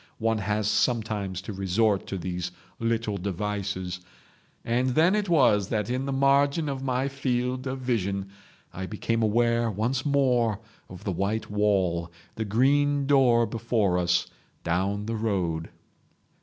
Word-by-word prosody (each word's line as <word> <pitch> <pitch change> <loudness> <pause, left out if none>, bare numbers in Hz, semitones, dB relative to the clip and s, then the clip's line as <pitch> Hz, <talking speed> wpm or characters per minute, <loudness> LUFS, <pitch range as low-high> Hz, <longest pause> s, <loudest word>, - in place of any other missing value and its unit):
One 115 0 0
has 105 +1 -1
sometimes 105 -4 0
to 105 - -6
resort 100 +2 +1
to 95 - -3
these 90 0 -4 0.3
little 115 -2 -1
devices..... 95 -1 -3 0.7
And 125 +2 +1
then 165 +4 +5
it 210 -2 0
was 115 - +4
that 105 0 -1
in 130 +2 -1
the - - -1
margin 140 +3 +3
of 135 -2 -3
my 130 0 0
field 130 -1 -2
of 130 0 -4
vision 100 -6 -1 0.4
I 95 0 -5
became 115 +2 -1
aware 115 +1 +2
once 115 +5 -1
more 125 -7 +2 0.3
of 90 -1 -10
the 100 - -2
white 100 +5 -2
wall, 95 -5 +1 0.2
the 110 - -3
green 140 +6 +2
door 130 -4 +4
before 110 -4 0
us 90 0 +2 0.4
down 95 +5 -1
the 115 +1 -2
road. 90 -7 -1
110 Hz, 140 wpm, -26 LUFS, 100-130 Hz, 0.7 s, then